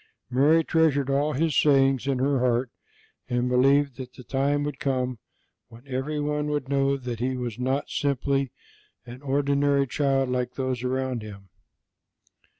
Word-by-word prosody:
Mary 150 +6 +4
treasured 145 -4 +2
all 145 +2 +1
His 155 +2 0
sayings 135 -2 +3
in 135 -2 +1
her 135 +1 +1
heart 125 0 +1 0.6
and 125 0 0
believed 135 +1 +3
that 130 -2 -8
the 125 - -12
time 140 +3 0
would 145 -2 -4
come 130 -3 -1 0.5
when 115 +3 -15
everyone 150 +2 -2
would 145 -3 -2
know 140 0 +1
that 125 -4 -6
He 130 +2 -1
was 120 -2 -5
not 130 +3 -1
simply 140 -1 -1 0.5
an 125 +2 -10
ordinary 140 0 +1
child 135 0 0
like 125 -1 -2
those 130 -2 -2
around 130 -1 -2
Him. 100 -2 -11
135 Hz, 150 wpm, -25 LUFS, 125-140 Hz, 0.6 s, Mary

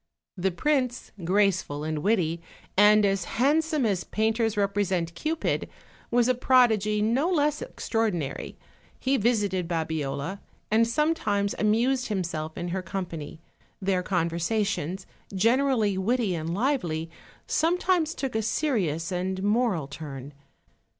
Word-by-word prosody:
The 190 0 0
prince, 255 - -1
graceful 185 -5 +1
and 155 0 -2
witty, 170 -3 +1 0.3
and 210 +1 +6
as 195 -2 +1
handsome 300 +2 +2
as 195 -5 0
painters 220 0 0
represent 195 -4 0
Cupid, 315 - -2 0.4
was 240 0 +3
a 255 - +4
prodigy 220 -5 +3
no 255 +10 +2
less 300 -4 +1
extraor 225 - -1
dinary; 160 -7 -4 0.4
he 265 +1 +1
visited 205 -6 +1
Babiola, 160 +1 -2 0.3
and 225 +1 +4
sometimes 235 -7 +1
amused 240 +4 +2
him 200 -4 -1
self 160 -2 -5
in 175 -1 -3
her 185 +2 -2
company: 170 -4 -6 0.4
their 190 -2 +1
conversations, 180 0 -1 0.3
generally 230 -1 +2
witty 225 0 +1
and 165 -1 -3
lively, 175 - -1 0.3
sometimes 340 -1 +1
took 270 -2 -3
a 220 - 0
serious 205 - -1
and 185 +1 -2
moral 205 - +1
turn. 140 -1 -8
205 Hz, 125 wpm, -26 LUFS, 175-245 Hz, 0.4 s, and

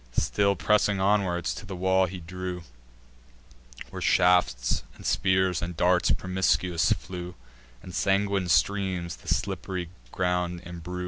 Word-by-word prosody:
Still 100 +11 +2
pressing 100 +4 +2
onward, 95 -3 +1
to - - -3
the 95 -1 -7
walls 95 0 +2
he 95 0 -7
drew, 90 +1 -6 1.3
Where - - -7
shafts, 90 -9 +3
and - - -13
spears, 95 -1 +2
and 85 -1 -5
darts 90 0 +3
promiscuous 95 -1 +1
flew, 90 -2 -3 0.5
And 90 - -10
sanguine 100 +1 +1
streams 90 +2 +1
the - - -18
slipp'ry 95 -2 -2 0.2
ground 90 -1 -1
embrue. 90 +1 -7
90 Hz, 125 wpm, -27 LUFS, 85-95 Hz, 1.3 s, shafts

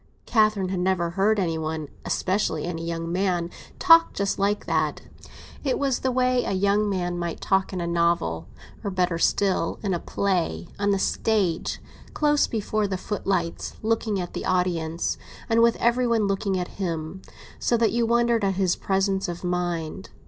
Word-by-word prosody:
Catherine 215 -4 +2
had 185 -1 -2
never 180 -2 +1
heard 200 +4 +2
any 165 -4 0
one—especially 160 +2 -2
any 165 -1 -4
young 165 0 -3
man—talk 190 - +3
just 200 0 -1
like 205 +1 +1
that. - - 0 0.6
It 270 -3 +1
was 275 -3 0
the 260 - 0
way 255 0 +2
a - - -2
young 200 +2 +2
man 175 -2 -2
might 170 -1 -3
talk 190 -1 +1
in 185 - -3
a 170 - -2
novel; 170 - 0 0.4
or 205 - -1
better 180 -3 0
still, 190 -2 +1
in 195 -3 0
a 175 - -1
play, 175 - -1
on 205 0 +1
the 200 - +3
stage, 190 -4 0 0.4
close 295 -1 +3
before 215 -1 -1
the 190 -1 -2
footlights, 185 -4 -2
looking 220 -2 0
at 175 -1 -5
the - - -4
audience, 175 -3 0 0.3
and 230 0 +3
with 235 0 +5
every 240 +1 +2
one 230 -3 +2
looking 195 -1 0
at 180 +2 -5
him, 165 0 -3 0.4
so 235 - +2
that 225 -3 +2
you 235 +1 +1
wondered 235 -1 +2
at 195 -1 +1
his 185 -2 +2
presence 195 0 0
of 175 0 -6
mind. 175 -1 -2
190 Hz, 170 wpm, -25 LUFS, 175-215 Hz, 0.6 s, with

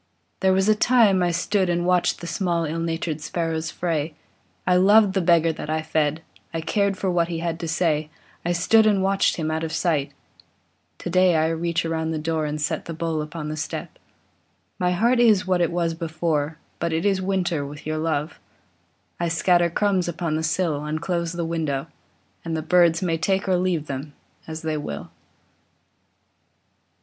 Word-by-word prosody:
There 190 - +3
was 190 +1 +2
a 215 - +6
time 215 -4 +4
I 175 - +2
stood 185 +2 0
and 175 0 0
watched 180 -1 +2
The - - -6
small, 170 0 -1
ill 160 +2 -3
natured 165 -2 -2
sparrows' 165 0 -2
fray; 160 -3 -2 0.5
I 180 - +3
loved 200 +2 +5
the 190 - +1
beggar 165 -2 +3
that 150 - -7
I 155 0 -1
fed, 155 0 0 0.3
I 165 - -3
cared 195 +5 0
for 190 -1 -1
what 170 -1 +2
he 170 -1 -3
had 165 0 -3
to 165 - -4
say, 155 -2 0 0.3
I 175 - 0
stood 215 +6 +4
and 200 -3 +3
watched 195 0 +2
him 155 -2 -2
out 160 +1 -2
of 160 - -3
sight; 155 -5 0 0.9
Today 185 0 +2
I 160 0 +2
reach 165 +1 -1
around 160 -1 -1
the 160 - -2
door 155 0 -1
And 150 +1 -3
set 150 +2 -2
a 165 - -4
bowl 165 -1 -2
upon 150 0 -6
the 155 - -3
step; 155 0 -5 0.8
My 180 - +2
heart 235 +7 +2
is 220 -5 +5
what 180 -1 +1
it 170 - +2
was 170 -1 0
before, 160 -2 -2 0.2
But 170 0 -1
it 160 +4 -1
is 195 -2 +2
winter 185 -5 0
with 145 +1 -9
your 155 0 -2
love; 155 -1 -2 0.8
I 170 - 0
scatter 175 +1 +3
crumbs 190 0 +1
upon 170 -2 -2
the 160 - -1
sill, 155 -2 0
And 155 +1 -3
close 170 0 -2
the 170 -1 -2
window, 155 -4 -2 0.6
and 165 -1 -2
the 155 - -3
birds 170 0 +4
May 165 -3 0
take 190 +4 0
or 185 - +3
leave 175 -4 0
them, 140 +1 -6 0.3
as 160 0 -6
they 155 -1 -1
will. 75 - -6
165 Hz, 190 wpm, -23 LUFS, 155-180 Hz, 0.9 s, a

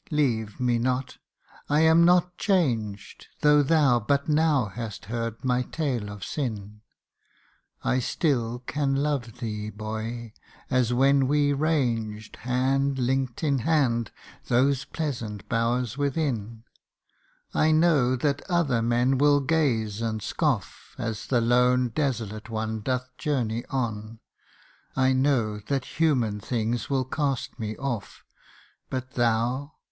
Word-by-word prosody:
leave 115 -9 0
me 120 -2 +1
not! 125 +2 -2 0.5
I 150 +2 +3
am 160 +1 +6
not 180 +1 +4
changed, 120 - -1
Though 150 0 +6
thou 145 -4 +4
but 140 +6 0
now 150 -4 +3
hast 105 +1 -7
heard 115 +2 -4
my 125 -1 +2
tale 125 -6 -2
of 100 -2 -8
sin: 105 - -4 1.0
I 130 - +1
still 125 -3 -1
can 140 -1 0
love 135 -5 -1
thee, 105 -3 -4
boy, 110 +2 -5 0.4
as 125 -2 +2
when 135 +2 +4
we 145 0 +2
ranged, 120 -8 -1
Hand 135 +2 0
link'd 130 +1 -1
in 140 -3 +2
hand, 120 -5 +1 0.4
those 135 +2 +2
pleasant 115 -10 -4
bowers 120 +1 0
within 125 -7 -2 0.9
I 155 - +3
know 155 -6 +4
that 140 +2 0
other 155 -10 +2
men 120 +3 +2
will 145 0 +5
gaze 125 -8 0
and 110 -1 -1
scoff - - -2
As 110 -2 -4
the 125 -3 +2
lone 125 +1 +3
desolate 115 -5 -2
one 110 0 -3
doth 125 +2 -3
journey 120 -7 -1
on; 110 -4 -3 0.8
I 130 0 +3
know 130 -6 +1
that 130 +7 -4
human 125 -10 +2
things 115 +2 -2
will 135 -2 +1
cast 135 -1 -2
me 110 -1 -4
off 120 -7 -4 0.7
But 130 0 -4
thou 120 +5 0
125 Hz, 125 wpm, -26 LUFS, 115-140 Hz, 1.0 s, am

